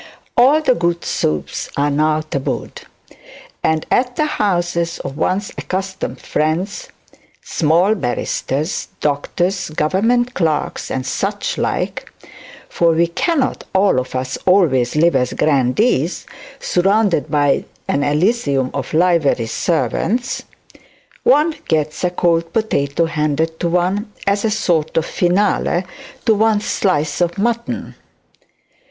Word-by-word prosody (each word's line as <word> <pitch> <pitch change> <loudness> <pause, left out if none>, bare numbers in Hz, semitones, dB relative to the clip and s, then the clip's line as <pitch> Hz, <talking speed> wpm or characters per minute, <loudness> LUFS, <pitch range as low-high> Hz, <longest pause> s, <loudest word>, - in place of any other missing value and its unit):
All 275 +6 +5
the 260 - +4
good 170 -5 -1
soups 75 -2 -2
are 145 +1 +2
now 155 +2 +2
tabooed; 145 -3 -4 0.8
and 160 0 +1
at 250 0 +2
the 305 - +1
houses 175 - 0
of 135 - -6
one's 195 +6 -1
accustomed 190 +1 -4
friends, 160 +6 -2 0.6
small 170 +6 +2
barristers, 140 - -2
doctors, 175 +6 -1
government 225 +11 +1
clerks, 160 -7 -1
and 130 -1 -3
such - - -2
like, - - -2 0.6
(for 170 -1 +2
we 165 +1 +3
cannot 265 - -1
all 190 -8 +4
of 130 0 -6
us 130 +1 -3
always 150 -11 +3
live 165 0 +3
as 125 -1 +1
grandees, 150 - +1 0.3
surrounded 195 -3 +1
by 145 -2 +2 0.2
an 140 - +1
Elysium 145 - +1
of 140 +2 -4
livery 165 -8 +3
servants), 185 - -1 0.8
one 325 -9 +4
gets 155 0 -1
a 180 - +3
cold 170 -2 +1
potato 165 -8 0
handed 160 0 -1
to 170 - 0
one 185 +5 0
as 200 +1 +1
a 220 - +2
sort 175 -9 0
of 165 - +2
finale 180 0 +1 0.4
to 225 - +5
one's 215 0 +2
slice 155 -5 0
of 175 +1 0
mutton. 235 +3 -2
170 Hz, 120 wpm, -18 LUFS, 150-200 Hz, 0.8 s, All